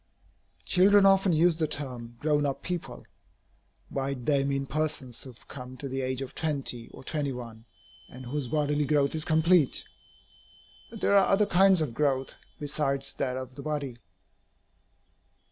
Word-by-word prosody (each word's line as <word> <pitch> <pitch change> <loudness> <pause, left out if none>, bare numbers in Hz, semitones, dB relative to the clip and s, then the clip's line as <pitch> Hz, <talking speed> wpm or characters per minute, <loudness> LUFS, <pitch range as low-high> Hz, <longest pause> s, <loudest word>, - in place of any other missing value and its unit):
Children 195 +2 +5
often 195 -1 +5
use 165 +1 +4
the 160 -2 +1
term 125 -5 -5
"grown 150 -1 +1
up 140 -2 -2
people." 175 -1 -5 0.9
By 135 0 -2
it 130 -3 -5
they 140 -2 +3
mean 140 0 -1
persons 150 -4 -2
who 130 - -5
have 120 - -21
come 130 -1 -9
to 140 - -5
the 135 0 -3
age 130 +1 -2
of 130 - -9
twenty, 135 -7 -3
or - - -13
twenty 145 -1 -2
one, 115 -3 -8 0.4
and 130 +1 -10
whose 135 +1 -3
bodily 150 +1 0
growth 140 -1 +2
is 155 -1 -2
complete. 160 -1 +3 1.0
But 225 -2 -10
there - - +2
are 195 - +6
other 200 +2 +4
kinds 190 -1 +5
of 145 -7 -2
growth, 135 -1 0 0.3
besides 140 -2 -1
that 130 -2 -1
of 130 -1 -6
the 140 - -9
body. 140 -5 -4
140 Hz, 160 wpm, -28 LUFS, 130-155 Hz, 1.0 s, are